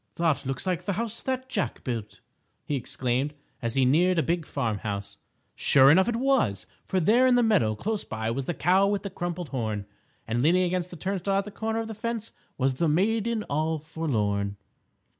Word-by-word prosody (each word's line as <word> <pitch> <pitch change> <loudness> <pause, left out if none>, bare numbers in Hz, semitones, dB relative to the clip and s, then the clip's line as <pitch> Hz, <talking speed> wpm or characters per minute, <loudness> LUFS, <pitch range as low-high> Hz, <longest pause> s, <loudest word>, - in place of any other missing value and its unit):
"That 160 -5 +1
looks 135 +5 -3
like 180 -1 -1
the 200 - 0
House 230 +3 -3
That 260 0 -2
Jack 210 -7 -2
Built!" 115 -4 -5 0.4
he - - -3
exclaimed, 130 +3 -2 0.3
as 115 -2 -2
he 135 -1 +4
neared 175 +7 +3
a 165 - +3
big 170 -2 -1
farm 110 -3 -1
house. 100 -1 -5 0.4
Sure 135 0 +6
enough 190 +4 +5
it 240 - 0
was, 245 - +1 0.2
for 190 - +1
there 235 +9 +4
in 250 - +5
the 245 - +4
meadow 180 - +3
close 215 - -2
by 110 +1 -3
was 130 +2 -3
the 175 - -1
Cow 190 +4 +3
With 200 0 0
the 200 - -5
Crumpled 175 -2 -4
Horn, 110 -6 -2 0.4
and 115 +2 0
leaning 175 +6 +4
against 180 0 -1
the 180 - -9
turnstile 195 +2 -1
at 195 - 0
the 210 - -8
corner 225 +2 -2
of 225 - -5
the 220 - -5
fence 230 0 -4 0.3
was 135 0 +2
the 165 +6 0
Maiden 220 +6 +1
All 155 +1 -1
Forlorn. 105 -11 -1
170 Hz, 200 wpm, -27 LUFS, 130-205 Hz, 0.4 s, Sure